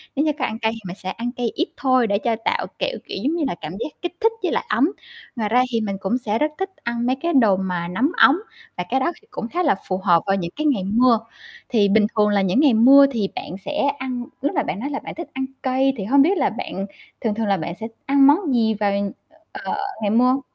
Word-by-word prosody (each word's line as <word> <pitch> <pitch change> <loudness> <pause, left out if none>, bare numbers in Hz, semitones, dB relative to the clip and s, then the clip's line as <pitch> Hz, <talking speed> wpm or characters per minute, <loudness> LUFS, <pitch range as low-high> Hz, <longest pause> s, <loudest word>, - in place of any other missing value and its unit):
Nếu 290 +3 +1
như 305 - +3
có 255 - +1
ăn 220 +1 -4
cay 220 0 +1
thì 225 - -8
mình 175 - -6
sẽ 185 - -7
ăn 235 +4 -4
cay 245 -2 -2
ít 340 - 0
thôi 255 -3 +3
để 200 0 +1
cho 230 -1 0
tạo, - - 0
kiểu - - -1
kiểu, - - -5
giống 305 +5 +1
như 335 - -1
là, 175 - -3
cảm 155 +1 -5
giác 235 - -3
kích 350 0 -4
thích 450 0 +3
với 355 - 0
lại - - -1
ấm. 245 +10 +3 0.5
Ngoài 215 -3 -2
ra 250 +2 +4
thì 230 -1 0
mình 195 -2 -3
cũng 200 +6 0
sẽ 220 -3 -2
rất 300 0 +1
thích 385 0 -2
ăn 235 0 -2
mấy 255 +1 +2
cái 335 +5 -2
đồ 220 -8 +4
mà 180 -2 -2
nóng 225 - +1
ấm 285 +6 +6 0.4
và 180 - -1
cái 265 +3 +2
đó 265 - +1
thì 435 - -27
cũng 225 - -5
khá 355 +7 -1
là - - +3
phù 185 - -1
hợp 175 -4 +3
vào 195 0 +2
những 170 -3 -3
cái 305 +1 -3
ngày 255 -11 +2
mưa. 230 +3 +3 0.5
Thì 210 -4 +3
bình 210 +1 +4
thường 210 0 +4
là 205 -1 +2
những 190 +6 +1
ngày 285 -4 +5
mưa 265 +5 +8
thì 215 -6 -1
bạn - - -6
sẽ 295 0 -1 0.2
ăn 255 -2 -4 0.2
lúc 285 +7 -1
mà 285 - +2
bạn 200 - -4
nói 275 - -3
là 280 - -3
bạn - - -9
thích 340 - -6
ăn 265 0 -2 0.2
cay, 265 +1 +2
thì 195 - -3
hông 275 +6 +5
biết 365 +8 +3
là 285 - +2
bạn 215 -4 -5 0.4
thường 220 -3 -1
thường 220 -1 -1
là 195 - +2
bạn 170 0 -4
sẽ 225 - -4 0.2
ăn 275 0 +5
món 295 0 +3
gì 225 -2 +2
vào, 205 -1 0 0.6
ờ, - - -4 0.3
ngày 205 - 0
mưa? 250 +4 +3
240 Hz, 270 wpm, -22 LUFS, 205-275 Hz, 0.6 s, mưa